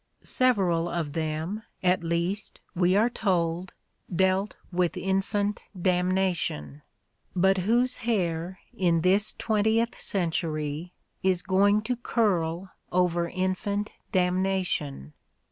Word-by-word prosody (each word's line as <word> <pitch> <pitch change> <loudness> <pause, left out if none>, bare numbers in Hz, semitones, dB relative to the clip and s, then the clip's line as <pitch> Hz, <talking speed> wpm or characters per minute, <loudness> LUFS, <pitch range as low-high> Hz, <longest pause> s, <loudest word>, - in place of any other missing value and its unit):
Several 190 -10 +2
of 165 -4 -3
them, 160 +6 -2 0.2
at 180 -1 +3
least, 170 +5 -2
we 180 0 +3
are 215 +3 +4
told, 180 -6 -1 0.4
dealt 190 +3 +1 0.2
with 175 -1 0
infant 200 +2 0 0.2
damnation; 180 - 0 0.5
but 190 +1 +3
whose 240 +7 +2
hair, 185 -6 -1 0.2
in 170 -3 +2
this 195 +4 +3
twentieth 220 +2 +1
century, 165 -3 -1 0.3
is 185 -2 +2
going 200 +2 +3
to 250 +3 -1
curl 190 -7 0 0.2
over 175 -1 +1
infant 190 +3 -1 0.2
damnation 180 - 0
185 Hz, 100 wpm, -27 LUFS, 170-200 Hz, 0.5 s, are